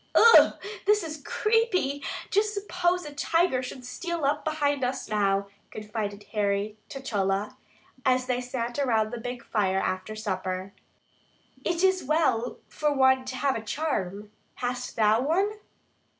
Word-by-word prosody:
"Ough! 465 0 +8 0.3
this 420 -1 +4
is 310 -2 -6
creepy. 380 - +1 0.3
Just 420 +1 +2
suppose 360 -3 0
a 295 - -7
tiger 330 -1 +2
should 250 0 -7
steal 340 +3 -3
up 290 +2 +1
behind 290 -3 0
us 250 +1 -2
now," 200 -2 +1 0.2
confided 210 -1 -5
Harry 205 0 0
to 270 - -6
Chola, 200 -5 -1 0.5
as 255 -1 +2
they 250 -1 -1
sat 245 0 -3
around 225 -5 +2
the 240 - -5
big 245 +1 -6
fire 190 -3 +1
after 190 +3 -2
supper. 190 -2 -3 0.9
"It 345 +1 0
is 375 -1 +3
well 270 -5 +1 0.2
to 260 -3 +3
have 270 +1 +1
a 225 - -3
charm; 210 - -3 0.2
hast 250 0 -4
thou 220 +1 +4
one?" 355 +9 +2
255 Hz, 135 wpm, -27 LUFS, 215-310 Hz, 0.9 s, Ough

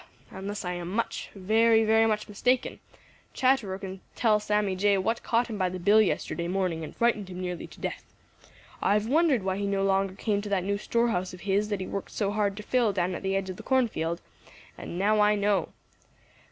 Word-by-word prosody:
Unless 200 +1 -5
I 180 - -2
am 175 -1 -5
much, 225 +5 -2
very, 220 +3 +4
very 220 +1 +4
much 215 -1 -1
mistaken, 245 +5 0 0.6
Chatterer 245 -8 +2
can 190 -1 -8
tell 215 -3 +3
Sammy 210 -2 0
Jay 200 +1 +3
what 225 +5 -1
caught 235 +1 +1
him 220 -3 -6
by 185 -1 +1
the 185 - -5
bill 205 +5 +5
yesterday 170 -4 -1
morning 180 -3 -1
and 155 - -8
frightened 215 -5 +1
him 180 0 -7
nearly 180 -1 -4
to - - -16
death. - - -4 0.8
I've 210 +1 +2
wondered 280 - +3
why 190 0 -1
he 200 0 -2
no 195 0 0
longer 195 -1 +1
came 205 0 -1
to 205 - -6
that 195 -3 +1
new 200 +1 -1
store 235 +2 +1
house 180 -3 -2
of 180 - -15
his 200 +1 0
that 205 -2 -2
he - - -3
worked 200 - -5
so 200 -2 -1
hard 205 -1 0
to 210 - -6
fill 240 -1 +2
down 185 -1 -1
at - - -5
the 195 0 -1
edge 190 -1 -1
of 185 - -9
the - - -8
cornfield, 215 -11 0 0.5
and 170 - -7
now 210 +3 +2
I 210 0 +4
know. 200 -4 +1
200 Hz, 215 wpm, -27 LUFS, 190-220 Hz, 0.8 s, bill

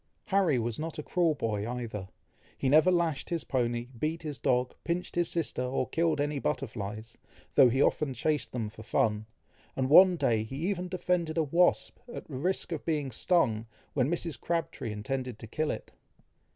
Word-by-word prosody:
Harry 190 -8 +3
was 115 +1 -2
not 160 +1 -4
a 150 - -4
cruel 170 -2 +1
boy 110 -4 -2
either; 115 -6 -5 0.5
he - - -1
never 155 +6 +6
lashed 170 -5 +1
his 170 -3 -2
pony, 120 -2 -1
beat 160 +4 -2
his 150 -3 -5
dog, 125 0 +1
pinched 175 +1 -2
his 175 -1 +1
sister, 165 -6 -1
or 125 0 -1
killed 165 -2 +1
any 145 0 0
butterflies, 110 -2 -4 0.3
though 135 -3 +7
he 130 +4 +3
often 150 -3 +1
chased 150 +4 -1
them 115 -4 -2
for 110 +1 -11
fun, 110 -1 0 0.5
and 130 0 -1
one 185 +3 +9
day 115 -9 +2
he 110 +5 -7
even 180 -2 -1
defended 180 -3 -1
a 165 - +3
wasp, 170 +5 +2
at - - -7
the 145 - -7
risk 180 +7 -1
of 160 - -3
being 150 -5 -1
stung, 115 -6 +1 0.3
when 130 -1 +2
Mrs. 170 -2 -3
Crabtree 165 -8 -2
intended 125 +3 -4
to - - -9
kill 155 +7 -2
it. - - -5
145 Hz, 180 wpm, -30 LUFS, 120-165 Hz, 0.5 s, one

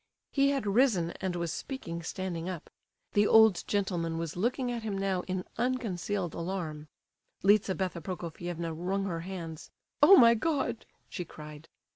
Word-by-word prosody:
He 275 0 +3
had 275 -4 0
risen, 200 -5 +3
and 190 -2 -1
was 170 -2 -2
speaking 170 -11 -5
standing 175 0 -4
up. 180 -4 -7 0.4
The 205 0 +4
old 220 -4 +6
gentleman 175 -5 -1
was 165 -2 -4
looking 245 +6 0
at 235 -1 -3
him 210 -3 -3
now 195 -2 0
in 185 0 -2
unconcealed 205 -7 -1
alarm. 165 -4 -4 0.6
Lizabetha 190 -3 +2
Prokofievna 170 -1 -5
wrung 190 +4 -2
her 170 -4 -2
hands. 165 -3 -7 0.3
"Oh, 390 - +9
my 235 -4 +8
God!" 255 -2 -1 0.2
she 180 - -5
cried. 150 -1 -11
185 Hz, 145 wpm, -30 LUFS, 170-220 Hz, 0.6 s, Oh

